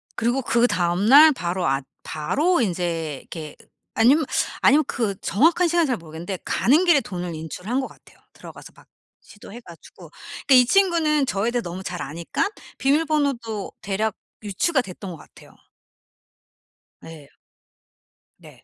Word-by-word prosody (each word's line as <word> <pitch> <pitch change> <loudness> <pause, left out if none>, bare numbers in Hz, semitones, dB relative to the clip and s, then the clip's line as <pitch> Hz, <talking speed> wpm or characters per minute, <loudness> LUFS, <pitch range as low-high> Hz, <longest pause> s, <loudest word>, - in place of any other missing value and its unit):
그리고 240 +4 0
그다음 205 -7 +1
날 295 +6 +8
바로 180 -6 -2
아 135 +1 0 0.2
바로 285 - 0
인제 170 -6 -2
이렇게 155 -3 -9 0.4
아니면 275 +8 +4 0.4
아니면 300 +2 +5
그 215 -5 -2
정확한 330 - +2
시간은 340 -2 +2
잘 250 - -1
모르겠는데 170 +3 -7
가는 300 +9 +2
길에 325 -6 +4
돈을 180 -6 -6
인출한 180 - -4
것 265 - -3
같아요 - - -20 0.2
들어가서 - - -13
막 - - -20 0.3
시도해 205 +2 -13
가지고. 170 -8 -15 0.4
그러니까 270 - +5
이 250 -1 +7
친구는 325 -4 +2
저에 200 +5 -1
대해 240 0 -1
너무 180 +1 -7
잘 180 - -5
아니까 170 - -3 0.3
비밀번호도 275 -7 0
대략 205 +2 -2 0.3
유추가 225 - 0
됐던 190 -2 -9
것 165 - -9
같아요. - - -18 1.5
네. 155 -4 -12 1.1
네. - - -17
220 Hz, 310 characters per minute, -22 LUFS, 175-280 Hz, 1.5 s, 날